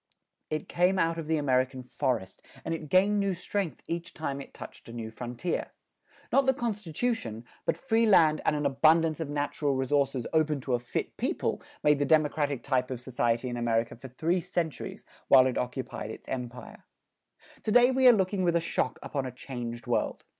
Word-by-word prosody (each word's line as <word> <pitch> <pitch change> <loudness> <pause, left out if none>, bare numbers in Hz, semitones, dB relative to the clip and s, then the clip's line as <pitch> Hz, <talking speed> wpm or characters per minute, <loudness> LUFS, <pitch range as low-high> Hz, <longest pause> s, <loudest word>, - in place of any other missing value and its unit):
It 155 0 -3
came 180 +2 +2
out 165 -1 +1
of 160 - -5
the 160 0 +2
American 130 -2 +1
forest, 125 -6 -2 0.2
and 165 - -1
it 155 -2 -5
gained 200 +4 +4
new 200 -2 0
strength 185 0 -3
each 170 +1 -5
time 140 -3 -3
it - - -11
touched - - -11
a - - -8
new 115 -2 -5
frontier. 125 +8 -4 0.6
Not 275 -1 +4
the 265 - +4
constitution, 205 - -2 0.2
but - - +1
free 230 -3 +2
land 160 -7 +5
and 150 - +2
an 145 -1 -1
abundance 155 +3 +4
of 160 -3 -3
natural 145 -1 -1
resources 135 -1 +1
open 155 -2 +2
to 130 0 -2
a 120 - +2
fit 120 0 -4
people, - - -1 0.2
made 150 -1 +4
the 145 - +2
democratic 145 -3 +2
type 130 -2 0
of 130 -2 -4
society 120 -1 0
in 120 -1 -3
America 115 -1 0
for 130 +3 -10
three 165 +8 0
centuries 170 -3 -4 0.2
while 130 -1 +8
it 130 - 0
occupied 125 -3 -4
its - - -9
empire. 125 -1 -6 0.8
To 215 - -2
day 245 +3 +6
we 260 0 +4
are - - +11
looking 195 -3 +1
with 170 -1 +2
a - - +4
shock 165 -5 -1
upon 135 -3 -3
a - - -5
changed 120 -2 -6
world. - - -1
145 Hz, 190 wpm, -29 LUFS, 125-170 Hz, 0.8 s, are